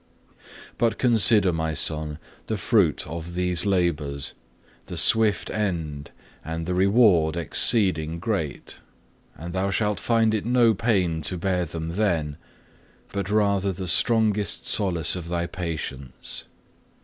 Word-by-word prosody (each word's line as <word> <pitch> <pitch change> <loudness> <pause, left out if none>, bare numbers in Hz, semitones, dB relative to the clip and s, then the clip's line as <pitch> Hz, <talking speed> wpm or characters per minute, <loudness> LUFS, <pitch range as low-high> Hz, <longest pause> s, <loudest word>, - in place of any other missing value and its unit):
6. - - -33 0.4
"But 115 -1 +1
consider, 110 -5 +4
My 80 -1 -2
Son, 75 -1 +2 0.3
the 110 - -2
fruit 100 - +1
of 85 +2 -7
these 90 +1 0
labours, 80 -7 -1 0.5
the - - -6
swift 110 -2 +2
end, 80 -9 -3 0.3
and 80 +1 -5
the 90 - -2
reward 95 -4 +3
exceeding 85 -2 +2
great; 90 -6 -4 0.6
and 85 +2 -8
thou 95 +1 -1
shalt 105 +1 0
find 115 -2 +1
it 110 - -1
no 120 -1 +3
pain 95 -7 0
to 90 +4 -2
bear 90 0 -1
them 80 0 -6
then, 85 -6 -1 0.8
but 100 -1 -3
rather 100 -2 +1
the 95 0 -6
strongest 105 +1 +2
solace 85 -6 +2
of 90 -2 -6
thy 85 0 -2
patience. 80 -7 -6
90 Hz, 130 wpm, -24 LUFS, 80-105 Hz, 0.8 s, consider